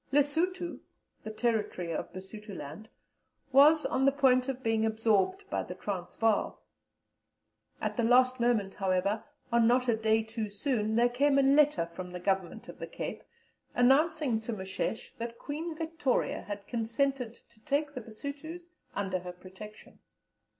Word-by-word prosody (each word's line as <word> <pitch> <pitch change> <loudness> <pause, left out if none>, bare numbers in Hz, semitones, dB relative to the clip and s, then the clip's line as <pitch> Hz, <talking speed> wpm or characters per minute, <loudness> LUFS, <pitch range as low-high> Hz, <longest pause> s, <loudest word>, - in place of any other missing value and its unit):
Lessuto 330 +5 +1 0.4
(the - - -5
territory 215 -6 -1
of - - -4
Basutoland) 195 -1 -9 0.6
was 295 +3 +6
on 260 - +1
the 275 - +6
point 265 -2 +3
of 260 -1 -4
being 225 -1 +1
absorbed 220 - +1
by - - 0
the - - -7
Transvaal. 205 +3 -1 1.2
At - - -3
the 235 - +2
last 255 +2 +4
moment, 230 -5 +1
however, 195 +2 0 0.3
and 235 -1 +4
not 250 +1 +3
a 235 - +3
day 220 0 +2
too 220 -1 -4
soon, 215 0 -1
there 240 +1 +5
came 275 +3 +2
a 275 - +5
letter 275 - +4
from 180 +2 -8
the 180 - -5
Governor 190 -1 -1
of - - -10
the - - -5
Cape - - -5 0.5
announcing 275 0 +3
to 225 +1 -5
Moshesh 190 +2 -4
that 235 0 -5
Queen 315 +3 -5
Victoria 320 -5 -1
had 205 -1 -7
consented 235 +1 -1
to 235 - -25
take 290 +5 -1
the 255 - -5
Basutos 285 +10 -8 0.3
under 190 -2 -1
her 180 0 -7
protection. 190 +4 -12
235 Hz, 150 wpm, -30 LUFS, 210-275 Hz, 1.2 s, was